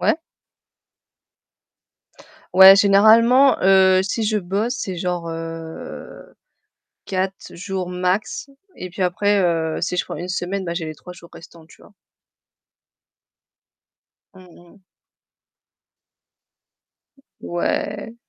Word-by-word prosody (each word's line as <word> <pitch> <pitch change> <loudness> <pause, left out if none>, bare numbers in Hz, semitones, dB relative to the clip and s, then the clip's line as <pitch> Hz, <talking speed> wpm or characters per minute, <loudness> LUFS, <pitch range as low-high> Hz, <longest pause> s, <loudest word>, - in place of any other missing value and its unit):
Ouais? - - +2 2.4
Ouais, 190 +1 +9
généralement, 225 +7 +5
heu, 190 -1 +4
si 205 +4 -3
je 215 0 0
bosse, 205 +7 -3
c'est 185 -2 -5
genre 175 -1 -4
heu 165 0 -9 0.7
4 190 0 -4
jours 185 0 -5
max. 185 +8 -3 0.3
Et 185 - -8
puis 185 +2 -8
après, 200 +3 +1
heu, 165 -3 -1
si 180 +1 -2
je - - -1
prends - - -7
une 175 +4 -7
semaine, 185 +1 -4
bah 170 - -4
j'ai 170 -1 -4
les 155 0 -7
3 180 +4 -12
jours 170 -1 -16
restants, 165 0 -15
tu - - -21
vois. 210 - -20 2.4
Mmh 185 -1 -16 0.3
mh. - - -24 2.6
Ouais. 205 +5 -4
185 Hz, 110 wpm, -20 LUFS, 175-200 Hz, 2.6 s, Ouais